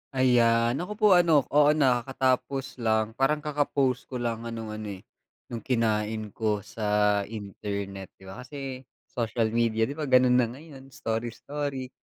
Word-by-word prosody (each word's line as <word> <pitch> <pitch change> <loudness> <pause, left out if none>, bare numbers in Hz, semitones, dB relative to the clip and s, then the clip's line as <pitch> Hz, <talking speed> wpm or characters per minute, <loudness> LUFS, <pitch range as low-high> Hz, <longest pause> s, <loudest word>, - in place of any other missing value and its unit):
Ayan 120 0 +3
ako 190 +4 -4
po 215 0 +3
ano, 160 -6 +4
oo, 150 +1 +5
nakakatapos 130 0 0
lang 110 -1 +1
parang 150 +5 0
kaka 150 -1 0
post 130 -3 0
ko 130 - -8
lang 120 -2 -2
ng 115 -2 -6
ano, 110 0 -6
eh, 95 - -15 0.5
nung 115 - -3
kinain 110 -2 -1
ko 105 -2 -1
sa 110 - -8 0.4
internet. 100 -2 -6
Di - - -20
ba 95 +5 -10
kasi 130 -1 -7 0.2
social 115 -2 -1
media 115 -1 +1
di 115 - 0
ba, 150 - -2
gano'n 125 -1 +5
na 120 - +3
ngayon, 135 +2 -12
story-story. 130 +4 -4
120 Hz, 155 wpm, -27 LUFS, 110-135 Hz, 0.5 s, oo